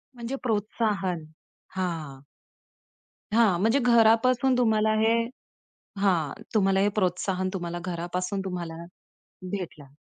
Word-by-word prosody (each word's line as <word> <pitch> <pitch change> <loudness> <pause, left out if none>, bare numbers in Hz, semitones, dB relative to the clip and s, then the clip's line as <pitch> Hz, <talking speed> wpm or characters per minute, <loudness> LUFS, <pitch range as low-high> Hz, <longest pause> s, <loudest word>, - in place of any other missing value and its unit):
म्हणजे 240 +3 -4
प्रोत्साहन, 205 -6 -1 0.5
हां. 165 -7 -3 1.1
हां, 215 -7 +4
म्हणजे 225 +6 +3
घरापासून 245 +2 +4
तुम्हाला 220 -2 +3
हे 225 +1 +4 0.9
हां. 180 -1 +1
तुम्हाला 195 -2 +3
हे 205 - +3
प्रोत्साहन 185 0 0
तुम्हाला 175 -2 -4
घरापासून 180 +2 -3
तुम्हाला, 170 -3 -5 0.7
भेटलं. 155 -8 -6
195 Hz, 95 wpm, -26 LUFS, 175-225 Hz, 1.1 s, हां